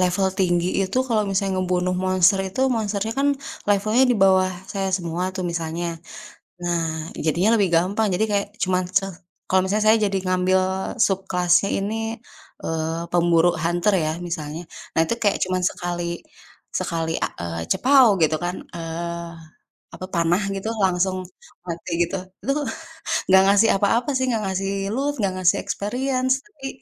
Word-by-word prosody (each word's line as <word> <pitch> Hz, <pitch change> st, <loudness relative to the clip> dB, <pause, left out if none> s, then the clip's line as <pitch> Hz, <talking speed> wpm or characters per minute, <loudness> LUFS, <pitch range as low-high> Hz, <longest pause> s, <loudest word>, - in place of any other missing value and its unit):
level 185 Hz, +1 st, +2 dB
tinggi 175 Hz, -2 st, +2 dB, 0.2 s
itu 190 Hz, +7 st, -1 dB
kalau 220 Hz, -3 st, +2 dB
misalnya 195 Hz, 0 st, 0 dB
ngebunuh 180 Hz, 0 st, 0 dB
monster 185 Hz, +1 st, +4 dB
itu, 200 Hz, +8 st, -5 dB, 0.2 s
monsternya, 215 Hz, 0 st, -2 dB
kan, 285 Hz, -, +3 dB, 0.4 s
levelnya 215 Hz, +5 st, +3 dB
di -, -, 0 dB
bawah 190 Hz, -1 st, +5 dB, 0.2 s
saya 195 Hz, -1 st, -1 dB
semua, 170 Hz, -1 st, -4 dB
tuh, 185 Hz, -, -3 dB
misalnya. 170 Hz, 0 st, -3 dB, 0.8 s
Nah, 175 Hz, -1 st, 0 dB, 0.4 s
jadinya 170 Hz, +6 st, +2 dB
lebih 200 Hz, -4 st, +2 dB
gampang 195 Hz, +6 st, +2 dB
jadi 215 Hz, +5 st, +2 dB
kayak 200 Hz, -1 st, +1 dB, 0.2 s
cuman 185 Hz, 0 st, +1 dB, 0.2 s
se 195 Hz, -, -6 dB, 0.4 s
kalau 190 Hz, 0 st, +4 dB
misalnya 210 Hz, +3 st, 0 dB
saya 225 Hz, -, +6 dB
jadi 195 Hz, 0 st, -1 dB
ngambil 185 Hz, +1 st, +2 dB, 0.5 s
subclass-nya 180 Hz, -1 st, +1 dB
ini, 205 Hz, +3 st, -2 dB, 0.7 s
eee, 160 Hz, +1 st, -2 dB
pemburu 175 Hz, 0 st, +4 dB
hunter 175 Hz, +4 st, +1 dB
ya, 155 Hz, -, 0 dB, 0.2 s
misalnya, 160 Hz, -1 st, -4 dB, 0.4 s
nah -, -, +6 dB
itu 165 Hz, -, -1 dB
kayak 205 Hz, -, +3 dB
cuman 185 Hz, 0 st, -1 dB
sekali 175 Hz, -2 st, -4 dB, 0.8 s
sekali 165 Hz, -3 st, -2 dB
a -, -, -2 dB
eee, 85 Hz, -1 st, -4 dB
cepaw 265 Hz, -1 st, +6 dB, 0.2 s
gitu, 155 Hz, 0 st, +3 dB
kan, 175 Hz, +1 st, -2 dB, 0.2 s
eee, 170 Hz, +1 st, -5 dB, 0.6 s
apa 185 Hz, -, -6 dB
panah 170 Hz, +1 st, +2 dB, 0.2 s
gitu, 195 Hz, +3 st, -3 dB
langsung 185 Hz, 0 st, +1 dB, 0.5 s
mati 170 Hz, +1 st, -5 dB
gitu. 175 Hz, +3 st, -3 dB, 0.3 s
Itu, 275 Hz, -, 0 dB, 0.8 s
nggak 190 Hz, 0 st, +7 dB
ngasih 205 Hz, +3 st, +5 dB
apa-apa 225 Hz, +6 st, +1 dB
sih, 260 Hz, -, 0 dB
nggak 225 Hz, -3 st, 0 dB
ngasih 195 Hz, 0 st, -2 dB, 0.2 s
loot, 280 Hz, +3 st, 0 dB
nggak 195 Hz, -3 st, 0 dB
ngasih 180 Hz, 0 st, +4 dB
experience. 255 Hz, +4 st, 0 dB
Tapi, 290 Hz, -10 st, -9 dB
185 Hz, 150 wpm, -23 LUFS, 175-205 Hz, 0.8 s, nggak